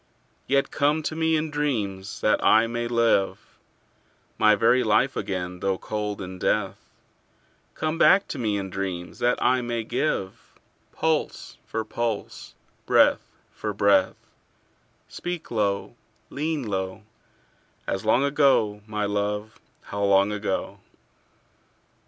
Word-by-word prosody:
Yet 135 0 +1
come 150 +2 +1
to 155 - -3
me 160 0 +2
in 155 0 -1
dreams, 105 -10 -2
that 110 - +2
I 110 +1 +5
may 120 +1 -3
live 115 -4 0 0.8
My 110 0 +6
very 125 +4 +3
life 130 +6 +2
again 90 -1 -4
though 95 0 0
cold 105 -1 -4
in 95 0 -8
death: 100 0 0 1.0
Come 155 +1 -2
back 195 +1 +5
to 140 - -5
me 105 -4 0
in 95 -1 -5
dreams, 90 -3 -5
that 120 0 +1
I 125 +1 +3
may 120 -1 -2
give 110 -5 -3 0.4
Pulse 160 -1 -2
for 110 -1 -3
pulse, 115 -1 -4 0.3
breath - - +4 0.2
for 105 -1 -4
breath: 100 -2 +3 0.9
Speak 175 -2 -6
low, 100 -3 -1 0.4
lean 155 0 -2
low, 95 -1 -4 0.8
As 95 -1 -2
long 110 +5 +3
ago, 135 -8 +2
my 105 -1 -2
love, 105 +1 -2 0.2
how 100 0 -4
long 100 +1 +4
ago! 105 -2 -3
110 Hz, 125 wpm, -25 LUFS, 100-130 Hz, 1.0 s, My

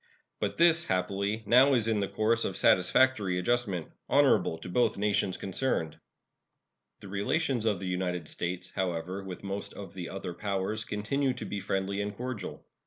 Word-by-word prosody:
But - - -2
this, 170 0 +5
happily, 100 +4 -1
now 130 +3 +6
is 115 -3 +1
in 110 -2 +2
the 100 - 0
course 115 +3 +1
of - - -2
satisfactory 95 0 +3
adjustment, 95 -3 -1 0.2
honorable 80 - +4
to 80 - -9
both 120 +6 +1
nations 100 -2 +1
concerned. 90 - -2 1.0
The 100 - -9
relations 115 - 0
of 105 -4 +1
the 95 - -5
United 90 -1 -2
States, 90 +1 -4
however, 90 0 -2
with 95 0 -8
most 100 0 -4
of 100 -4 -8
the 90 -3 -6
other 95 -2 -5
powers 100 +3 -2
continue 130 +7 0
to - - -6
be 100 - -4
friendly 95 +1 -1
and 105 0 -4
cordial. 125 -6 -5
100 Hz, 165 wpm, -29 LUFS, 90-115 Hz, 1.0 s, now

